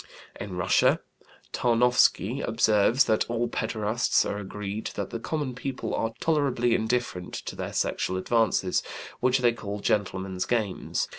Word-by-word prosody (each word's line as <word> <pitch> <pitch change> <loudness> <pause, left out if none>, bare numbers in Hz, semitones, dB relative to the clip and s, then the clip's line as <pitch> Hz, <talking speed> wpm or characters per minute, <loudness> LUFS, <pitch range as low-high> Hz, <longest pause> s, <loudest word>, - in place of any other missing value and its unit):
In 95 -3 -6
Russia, 90 0 +3 0.5
Tarnowsky 125 0 +3
observes 110 +3 +3
that 110 +1 +1
all 120 0 0
pederasts 110 -1 0
are 100 - -3
agreed 105 +1 -5
that - - -4
the 115 - -4
common 145 0 -3
people 125 +1 -4
are 115 - -1
tolerably 135 -7 +1
indifferent 110 -6 -1
to - - -6
their - - -5
sexual 95 - -1
advances, 105 -2 +1 0.4
which 130 +1 +3
they 120 -2 +3
call 105 -3 -6
"gentlemen's 95 -2 -1
games." 110 -6 -1
115 Hz, 135 wpm, -27 LUFS, 100-125 Hz, 0.5 s, Russia